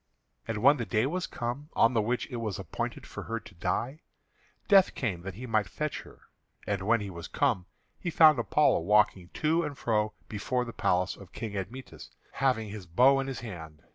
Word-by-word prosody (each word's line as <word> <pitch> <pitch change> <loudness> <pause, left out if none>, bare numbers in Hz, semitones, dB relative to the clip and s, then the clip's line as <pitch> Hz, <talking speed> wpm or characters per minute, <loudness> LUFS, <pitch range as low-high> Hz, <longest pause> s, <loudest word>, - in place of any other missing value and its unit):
And 115 - -2
when 140 +2 +7
the 120 - -3
day 110 +6 +2
was 180 +6 -2
come 125 +5 -4
on 115 +2 +4
the 115 - +3
which 120 +4 -1
it 125 - -3
was 110 -5 -3
appointed - - -5
for - - -7
her 115 0 -3
to - - -15
die, 130 - -2 0.7
Death 195 -2 +5
came 100 -9 -2
that 95 +1 -7
he 125 +5 -7
might 110 -5 0
fetch 150 +8 -3
her. - - -16 0.4
And 100 -2 -1
when 115 0 +3
he 100 -1 -5
was 85 -2 -7
come, 115 -11 0 0.3
he 175 - -3
found 155 -4 +6
Apollo 150 +5 +3
walking 95 -1 +2
to 160 +2 +2
and 145 -4 -4
for 105 -2 0
before 125 +4 -2
the 115 - -7
palace 90 +1 +1
of 100 -3 -14
King 110 -3 -5
Admetus, 115 +7 -7 0.2
having 125 -6 0
his 100 -3 -8
bow 130 +11 +5
in 135 - -2
his 135 -3 -5
hand. 80 -9 -9
115 Hz, 200 wpm, -29 LUFS, 100-135 Hz, 0.7 s, when